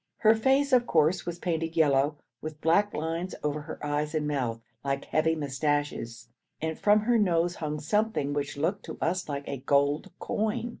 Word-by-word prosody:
Her 220 Hz, -1 st, +7 dB
face, 265 Hz, +5 st, +2 dB
of 245 Hz, -1 st, +5 dB
course, 160 Hz, +3 st, +2 dB
was 175 Hz, -1 st, -3 dB
painted 165 Hz, -2 st, -2 dB
yellow, 145 Hz, -1 st, +3 dB, 0.2 s
with 155 Hz, -1 st, -6 dB
black 200 Hz, +6 st, +3 dB
lines 165 Hz, +4 st, -3 dB
over 150 Hz, 0 st, -1 dB
her 155 Hz, +2 st, -7 dB
eyes 150 Hz, +1 st, -1 dB
and 150 Hz, -1 st, 0 dB
mouth 125 Hz, -6 st, -1 dB, 0.2 s
like 140 Hz, 0 st, -2 dB
heavy 160 Hz, +1 st, +1 dB
moustaches, 140 Hz, -5 st, -2 dB, 0.3 s
and 160 Hz, 0 st, -2 dB
from 210 Hz, +4 st, +4 dB
her 235 Hz, +1 st, +3 dB
nose 175 Hz, -3 st, +2 dB
hung 150 Hz, -1 st, -3 dB
something 160 Hz, -2 st, 0 dB
which 145 Hz, -1 st, -3 dB
looked 175 Hz, +7 st, -1 dB
to -, -, -7 dB
us 180 Hz, 0 st, -1 dB
like 140 Hz, 0 st, -4 dB
a 140 Hz, -, -3 dB
gold 140 Hz, +2 st, +1 dB
coin. 220 Hz, +3 st, -1 dB
155 Hz, 180 wpm, -28 LUFS, 145-185 Hz, 0.3 s, Her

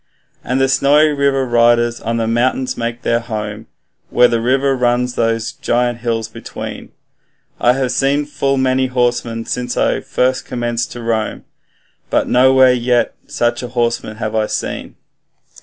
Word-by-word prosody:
And 125 Hz, +2 st, -1 dB
the 135 Hz, -, +3 dB
Snowy 145 Hz, +3 st, +4 dB
River 140 Hz, -2 st, +1 dB
riders 120 Hz, 0 st, +2 dB
on 115 Hz, +1 st, -2 dB
the 115 Hz, -, 0 dB
mountains 125 Hz, +3 st, 0 dB
make 120 Hz, +1 st, -4 dB
their 115 Hz, 0 st, +1 dB
home, 110 Hz, -2 st, -6 dB, 0.4 s
Where 125 Hz, 0 st, +5 dB
the 115 Hz, -1 st, 0 dB
river 135 Hz, +3 st, +2 dB
runs 125 Hz, 0 st, +1 dB
those 115 Hz, -1 st, 0 dB
giant 120 Hz, 0 st, -1 dB
hills 115 Hz, -1 st, -2 dB
between; 115 Hz, -, -8 dB, 0.7 s
I 120 Hz, -, +4 dB
have 130 Hz, -1 st, -1 dB
seen 140 Hz, +3 st, +1 dB
full 140 Hz, -2 st, -1 dB
many 130 Hz, 0 st, +1 dB
horsemen 120 Hz, -2 st, -1 dB
since 125 Hz, 0 st, -3 dB
I -, -, +1 dB
first 130 Hz, +1 st, 0 dB
commenced 120 Hz, -1 st, -3 dB
to 120 Hz, -, -8 dB
roam, 110 Hz, -2 st, -2 dB, 0.7 s
But -, -, +1 dB
nowhere 130 Hz, 0 st, +5 dB
yet 120 Hz, 0 st, +1 dB
such 120 Hz, 0 st, -1 dB
horsemen 120 Hz, -3 st, -2 dB
have 110 Hz, -1 st, -3 dB
I 110 Hz, -1 st, +1 dB
seen.' -, -, -4 dB
120 Hz, 150 wpm, -17 LUFS, 115-130 Hz, 0.7 s, Where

